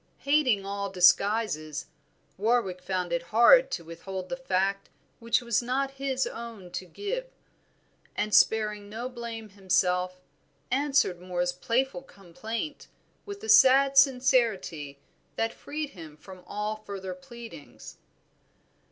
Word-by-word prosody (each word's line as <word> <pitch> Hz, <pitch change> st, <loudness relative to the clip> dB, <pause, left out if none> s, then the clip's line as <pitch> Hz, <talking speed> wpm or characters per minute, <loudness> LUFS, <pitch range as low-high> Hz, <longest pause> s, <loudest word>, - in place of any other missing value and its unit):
Hating 275 Hz, -9 st, +2 dB
all 200 Hz, 0 st, -3 dB
disguises, 180 Hz, -4 st, +2 dB, 0.5 s
Warwick 205 Hz, -3 st, 0 dB
found 180 Hz, -2 st, -2 dB
it 170 Hz, -, 0 dB
hard 235 Hz, -, +6 dB
to 170 Hz, -, -4 dB
withhold 185 Hz, +3 st, -7 dB
the -, -, -2 dB
fact 195 Hz, -5 st, -1 dB, 0.3 s
which 230 Hz, +2 st, +1 dB
was 235 Hz, -2 st, +1 dB
not 265 Hz, +3 st, -1 dB
his 265 Hz, -1 st, 0 dB
own 225 Hz, -6 st, -8 dB
to 185 Hz, +1 st, -5 dB
give, 485 Hz, -, -4 dB, 0.9 s
and 210 Hz, 0 st, -2 dB
sparing 210 Hz, -2 st, +3 dB
no 230 Hz, +4 st, -5 dB
blame 235 Hz, -3 st, -7 dB
to -, -, -23 dB
himself, 185 Hz, -1 st, 0 dB, 0.5 s
answered 270 Hz, -9 st, +1 dB
Moor's 180 Hz, -1 st, -2 dB
playful 255 Hz, +9 st, -1 dB
complaint 225 Hz, -, -7 dB, 0.4 s
with 405 Hz, +1 st, -8 dB
a -, -, -6 dB
sad 275 Hz, -6 st, +6 dB
sincerity 235 Hz, -, +2 dB, 0.4 s
that 225 Hz, 0 st, -1 dB
freed 300 Hz, 0 st, -6 dB
him 160 Hz, -4 st, -11 dB
from 185 Hz, +2 st, -13 dB
all 210 Hz, +1 st, -3 dB
further 195 Hz, -3 st, -7 dB
pleadings. 235 Hz, -, -12 dB
215 Hz, 125 wpm, -27 LUFS, 185-260 Hz, 0.9 s, hard